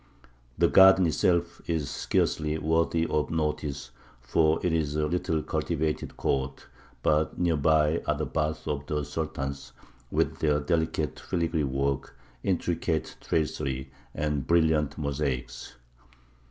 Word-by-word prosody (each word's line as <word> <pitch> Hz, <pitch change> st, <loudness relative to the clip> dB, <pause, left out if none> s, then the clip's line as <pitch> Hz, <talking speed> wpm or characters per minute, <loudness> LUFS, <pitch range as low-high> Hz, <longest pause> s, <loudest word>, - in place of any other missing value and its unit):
The -, -, +4 dB
garden 95 Hz, -1 st, +7 dB
itself 85 Hz, +1 st, +1 dB
is 80 Hz, -4 st, 0 dB
scarcely 75 Hz, +3 st, 0 dB
worthy 80 Hz, +1 st, +1 dB
of 75 Hz, -2 st, 0 dB
notice, 75 Hz, -4 st, -2 dB, 0.3 s
for 80 Hz, +6 st, +2 dB
it 85 Hz, -, +2 dB
is 75 Hz, -3 st, 0 dB
a 75 Hz, 0 st, +1 dB
little 80 Hz, -1 st, -1 dB
cultivated 75 Hz, 0 st, -2 dB
court; 65 Hz, 0 st, -1 dB, 0.4 s
but 75 Hz, 0 st, +2 dB
near 85 Hz, -2 st, +2 dB
by 75 Hz, +1 st, +3 dB
are -, -, +2 dB
the -, -, -1 dB
baths 75 Hz, 0 st, -2 dB
of 70 Hz, -1 st, -3 dB
the 75 Hz, -1 st, -1 dB
Sultans, 70 Hz, -2 st, -4 dB, 0.4 s
with -, -, 0 dB
their 75 Hz, -2 st, +2 dB
delicate 80 Hz, 0 st, -1 dB
filigree 85 Hz, -3 st, -1 dB
work, 70 Hz, 0 st, -2 dB, 0.3 s
intricate 85 Hz, -3 st, -1 dB
tracery, 70 Hz, -4 st, -2 dB, 0.2 s
and 75 Hz, -3 st, -1 dB
brilliant 80 Hz, -3 st, +2 dB
mosaics. 70 Hz, -5 st, -3 dB
75 Hz, 125 wpm, -27 LUFS, 70-80 Hz, 0.4 s, garden